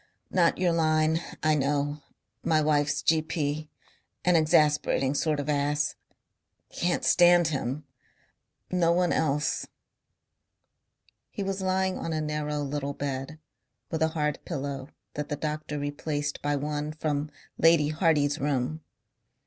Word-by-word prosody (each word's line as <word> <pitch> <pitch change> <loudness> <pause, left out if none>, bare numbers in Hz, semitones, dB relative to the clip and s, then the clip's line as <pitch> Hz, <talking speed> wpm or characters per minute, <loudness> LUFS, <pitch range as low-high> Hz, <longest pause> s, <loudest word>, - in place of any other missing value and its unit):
"Not 175 -3 +3
your 180 -1 +2
line. 160 0 +2 0.2
I 155 0 +4
know.... 145 +1 0 0.4
My 160 -1 +3
wife's 150 -1 +1
G.P. 155 -1 0 0.6
an 180 -1 +4
exasperating 150 -3 +3
sort 150 0 0
of 145 - -3
ass. 145 0 +1 0.8
Can't 175 0 -1
stand 175 -2 +5
him. 140 0 -3 0.9
No 175 -2 +3
one 175 0 +2
else." 150 -1 0 1.6
He 200 - -4
was 195 0 -2
lying 190 0 0
on 165 - -3
a 155 - -1
narrow 150 -1 -2
little 140 0 -3
bed 140 +2 -4 0.5
with 160 - -2
a 160 - +4
hard 150 -1 0
pillow 140 -3 -4 0.2
that 150 0 -4
the 145 - -1
doctor 150 0 -4
replaced 145 0 -3
by 145 0 0
one 150 +1 -3
from 150 -1 -2 0.3
Lady 165 -2 +5
Hardy's 155 -2 +2
room. 145 +2 -1
150 Hz, 125 wpm, -27 LUFS, 145-160 Hz, 1.6 s, stand